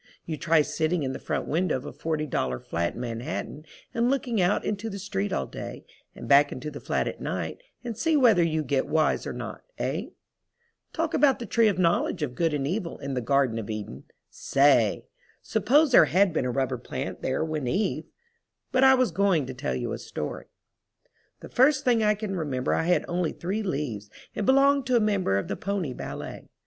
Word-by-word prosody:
You 160 - -3
try 160 0 +3
sitting 160 +2 -1
in 130 -1 -2
the - - -6
front - - -3
window 170 -1 +1
of 130 - -9
a - - -7
$40 150 - -2
flat 85 +1 -2
in - - -7
Manhattan 120 +4 -5 0.3
and 235 0 +1
looking 250 -6 0
out 180 +3 +1
into 210 +2 -2
the 200 - -6
street 105 - -3
all 65 - -1
day, - - -8 0.3
and - - -9
back 140 +1 +6
into 150 +4 -6
the 145 - -8
flat - - -1
at - - -5
night, - - -4 0.2
and 235 -2 -4
see 315 +7 +2
whether 230 -9 +5
you 160 -2 +1
get 135 -1 0
wise 155 0 +1
or - - -4
not—hey? - - -5 0.8
Talk 330 0 -2
about 290 -4 +4
the 235 - -6
tree 230 +1 +3
of 200 - +1
knowledge 170 -1 +1
of 130 -4 -3
good 165 +4 +1
and 145 -2 -1
evil 175 +3 -3
in 140 -1 -5
the 125 - -1
garden 130 -2 +1
of 110 - -7
Eden—say! 115 +3 0 0.4
suppose 270 +8 +3
there - - +8
had 190 0 +3
been 145 - 0
a 125 - 0
rubber 130 -1 -1
plant 130 +2 -5
there 130 +4 -1
when 155 -4 -3
Eve—but 260 - -3
I 265 0 +8
was 255 -6 +2
going 185 -5 +2
to 130 - -6
tell 120 - -3
you 65 - -3
a - - -5
story. - - -6 0.9
The - - -10
first 265 +2 +3
thing 240 -3 +3
I 210 0 +3
can 205 -2 -4
remember 140 -7 -1
I 165 - 0
had 175 +1 +2
only 175 -1 -1
three 195 +5 -3
leaves 135 - -3 0.3
and 210 - -2
belonged 275 0 +4
to 255 - +2
a - - +6
member 200 - +1
of 100 - -2
the - - -2
pony 195 -9 -3
ballet. - - -7
170 Hz, 200 wpm, -26 LUFS, 135-220 Hz, 0.9 s, there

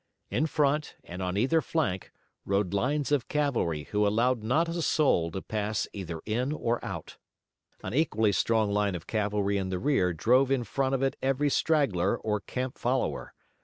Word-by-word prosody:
In 155 - +1
front, 150 -1 0
and 90 +2 -7
on 90 +1 -2
either 135 +9 +3
flank, 95 - -2 0.3
rode 100 -1 0
lines 140 +8 0
of 145 -4 +1
cavalry 120 - 0
who 105 0 +2
allowed 120 +3 +2
not 130 +10 +1
a 170 +1 -2
soul 135 - +2
to 95 +3 -6
pass 105 0 -2
either 85 -5 -6
in 125 +6 -1
or 120 -5 -1
out. - - -6 0.7
An 95 - -4
equally 110 -8 +2
strong 110 +1 +1
line 100 -2 +1
of 85 - -7
cavalry 105 -2 0
in 95 -1 -3
the 95 - -1
rear 95 -7 +2
drove 125 - +3
in 135 -3 +1
front 135 +2 0
of 135 - -1
it 135 - 0
every 135 +2 +1
straggler 120 - +2
or 105 -1 -1
camp 125 +4 -5
follower. 125 +2 -1
115 Hz, 175 wpm, -28 LUFS, 100-135 Hz, 0.7 s, either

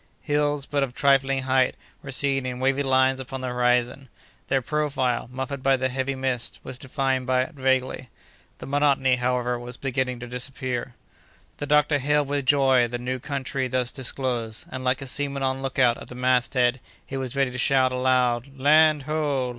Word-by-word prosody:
Hills, 145 -1 0
but 145 -1 -1
of 130 -2 -2
trifling 135 -1 +2
height, 130 -1 +2 0.3
were 140 - -10
seen 135 0 +1
in 125 0 -4
wavy 135 +2 +1
lines 130 -1 +2
upon 130 0 -6
the 130 - -3
horizon. 125 +1 0 0.4
Their 135 -1 +1
profile, 135 -5 -1
muffled 130 +2 -4
by 135 0 +3
the 130 0 0
heavy 130 +1 -2
mist, 125 -5 -3
was 125 - -6
defined 130 -2 -1
but 130 +4 +1
vaguely. 130 -2 0 0.5
The - - -9
monotony, 135 -2 +2
however, 125 0 0
was 120 +1 -8
beginning 130 -2 -2
to - - -5
disappear. 125 0 -4 0.6
The 145 - -5
doctor 150 0 +3
hailed 145 +1 +1
with 140 -2 -2
joy 135 -3 +4
the 120 +1 -4
new 125 +1 -3
country 135 0 -3
thus 125 -1 -1
disclosed, 125 -4 -3
and, 130 0 -5
like 130 +2 0
a - - -8
seaman 140 +1 -3
on 130 0 -1
lookout 130 -3 +2
at - - -10
the 125 - -10
mast 125 +1 +1
head, 125 +1 +2 0.3
he 135 - -7
was 130 -1 -4
ready 135 -2 +1
to 125 - -5
shout 130 0 +3
aloud: 125 -1 +1
"Land, 150 +1 +5
ho! 145 -3 -1
130 Hz, 180 wpm, -25 LUFS, 125-135 Hz, 0.6 s, Land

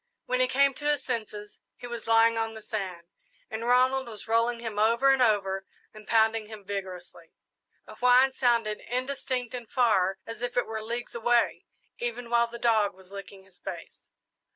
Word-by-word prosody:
When 255 0 0
he 255 - +4
came 275 +2 +3
to 295 +2 -2
his 295 - +1
senses 215 -4 -5 0.2
he - - -10
was 235 -2 -7
lying 225 0 +5
on 225 0 -2
the 220 - -9
sand, 190 -6 -5 0.5
and 225 +2 -4
Ronald 255 +1 +3
was 220 -2 -8
rolling 230 +1 +2
him 225 -3 -4
over 235 +5 +4
and 265 - +1
over 195 -4 +2 0.3
and 215 -1 -13
pounding 220 -1 +2
him 215 -2 -10
vigorously. 185 -4 -7 0.5
A - - -11
whine 250 +2 +5
sounded 235 -5 +1
indistinct 255 -1 -3
and 240 -3 -7
far, 215 -8 +2
as 230 0 -8
if 245 0 -3
it 245 - +3
were 220 0 -5
leagues 235 +2 -5
away, 235 0 +1 0.3
even 360 - -4
while 235 0 +4
the 235 0 -8
dog 220 -4 +2
was 190 0 -18
licking 195 -1 -9
his 190 -2 -20
face. - - -9
230 Hz, 180 wpm, -28 LUFS, 210-245 Hz, 0.5 s, lying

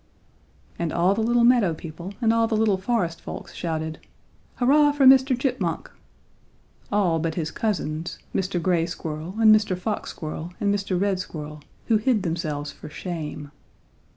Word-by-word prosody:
"And 170 -2 -1
all 175 +3 +3
the 220 - -1
little 235 +1 +3
meadow 235 -9 +4
people 170 +5 -8
and 225 0 +4
all 230 0 +3
the 220 -1 0
little 210 -3 +2
forest 190 -5 -1
folks - - -8
shouted 160 -1 -3 0.6
'Hurrah 290 +3 +4
for 285 -2 +3
Mr. 260 -1 +6
Chipmunk!' 265 +1 -2 1.0
All 185 -6 +2
but 160 0 -2
his 160 -3 -2
cousins, 165 -7 -2 0.2
Mr. 185 -1 -1
Gray 170 -1 +1
Squirrel 160 +4 -6
and 220 -1 +7
Mr. 210 -4 0
Fox 210 +4 -3
Squirrel 155 +2 -6
and 200 0 +1
Mr. 195 -3 -1
Red 195 -1 +1
Squirrel, 150 -4 -7 0.2
who 225 - +3
hid 220 -2 +1
themselves 155 -4 -3
for - - -11
shame. 150 -4 -6
185 Hz, 155 wpm, -24 LUFS, 165-220 Hz, 1.0 s, and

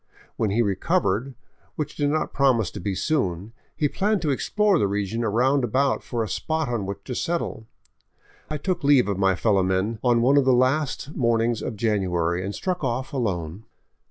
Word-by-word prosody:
When 110 - 0
he 115 +4 +2
recovered, 100 +4 0 0.4
which 150 -1 -4
did 145 -1 0
not 155 +1 -1
promise 125 -8 +2
to - - -7
be 95 +1 -3
soon, 100 - -1 0.2
he 150 - +1
planned 200 +5 0
to 150 - +1
explore 205 +7 +2
the 100 - +2
region 100 +3 -2
round 125 +5 +2
about 130 +4 +1
for 120 -2 -3
a - - -4
spot 160 +4 -2
on 110 -5 -2
which 100 0 -6
to 125 - -5
settle. 145 -7 -3 0.8
I 150 - -2
took 180 +2 -2
leave 140 -4 +5
of 100 -2 -2
my 95 -1 +3
fellow 100 0 +2
men 95 +4 0
on 120 -2 +3
one 135 +3 +4
of 140 - +4
the 130 - +5
last 135 +3 0
mornings 115 -2 +1
of 115 - -4
January 90 -5 0
and 100 +2 -4
struck 180 -3 -3
off 130 +1 -2
alone. 95 - -3
120 Hz, 185 wpm, -24 LUFS, 100-140 Hz, 0.8 s, leave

